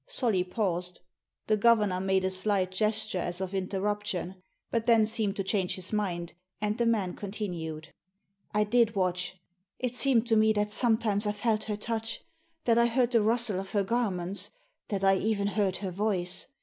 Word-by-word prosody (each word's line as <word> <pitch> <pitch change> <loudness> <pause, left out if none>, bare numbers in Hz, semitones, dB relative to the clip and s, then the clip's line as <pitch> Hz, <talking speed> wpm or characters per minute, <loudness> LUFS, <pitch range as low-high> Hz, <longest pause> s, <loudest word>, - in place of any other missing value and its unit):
Solly 235 - +1
paused. 180 -2 -2 0.4
The 215 - +3
governor 210 -4 +3
made 190 0 +1
a 190 - +1
slight 185 -1 +1
gesture 215 0 0
as 175 0 -3
of 190 0 -4
interruption; 195 0 -2 0.4
but 230 -1 0
then 225 -2 +5
seemed 215 -2 0
to 195 - -2
change 190 -2 +1
his 185 +2 -2
mind, 175 -5 -2 0.3
and 210 0 0
the 235 - +2
man 205 -6 +1
continued. 175 -6 -5 0.3
" 195 +1 -45
I 210 0 +2
did 225 +1 +2
watch. 180 -1 -1 0.4
It 250 -1 -3
seemed 250 -4 +3
to 230 -2 +2
me 220 0 +4
that 210 0 0
sometimes 220 -3 +2
I 210 - +1
felt 215 0 0
her 210 -1 -3
touch, 225 +1 -4 0.4
that 235 -1 +3
I 235 - +5
heard 245 +1 +1
the 230 -3 +4
rustle 225 -2 +2
of 195 0 -7
her 205 -2 +2
garments, 195 -4 -1 0.4
that 195 -2 -2
I 195 0 +5
even 200 -1 0
heard 195 -3 0
her 190 -1 -4
voice. 190 -2 -1
205 Hz, 180 wpm, -29 LUFS, 185-220 Hz, 0.4 s, then